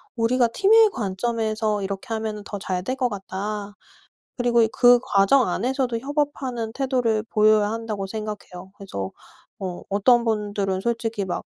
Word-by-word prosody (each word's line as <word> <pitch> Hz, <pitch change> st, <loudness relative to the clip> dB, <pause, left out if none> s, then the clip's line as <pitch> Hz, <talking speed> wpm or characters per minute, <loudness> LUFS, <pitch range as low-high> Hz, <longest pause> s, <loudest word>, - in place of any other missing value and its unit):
우리가 240 Hz, +1 st, +2 dB
팀의 435 Hz, -, +5 dB
관점에서 215 Hz, -, -1 dB
이렇게 195 Hz, +4 st, -5 dB
하면은 215 Hz, -1 st, -4 dB
더 205 Hz, -, -6 dB
잘 185 Hz, -1 st, -3 dB
될 255 Hz, +7 st, -2 dB
것 255 Hz, -2 st, 0 dB
같다. 205 Hz, 0 st, -5 dB, 0.6 s
그리고 240 Hz, -2 st, +3 dB
그 245 Hz, 0 st, +6 dB
과정 205 Hz, +5 st, +3 dB
안에서도 245 Hz, +5 st, -1 dB
협업하는 270 Hz, -4 st, -2 dB
태도를 250 Hz, -5 st, 0 dB
보여야 215 Hz, -1 st, +4 dB
한다고 220 Hz, -3 st, -4 dB
생각해요. 205 Hz, -3 st, -7 dB
그래서 100 Hz, -, -5 dB, 0.5 s
어 185 Hz, -2 st, -5 dB
어떤 235 Hz, +4 st, +3 dB
분들은 205 Hz, -3 st, -1 dB
솔직히 230 Hz, -2 st, -2 dB
막 185 Hz, -, -3 dB
220 Hz, 315 characters per minute, -23 LUFS, 200-245 Hz, 0.6 s, 그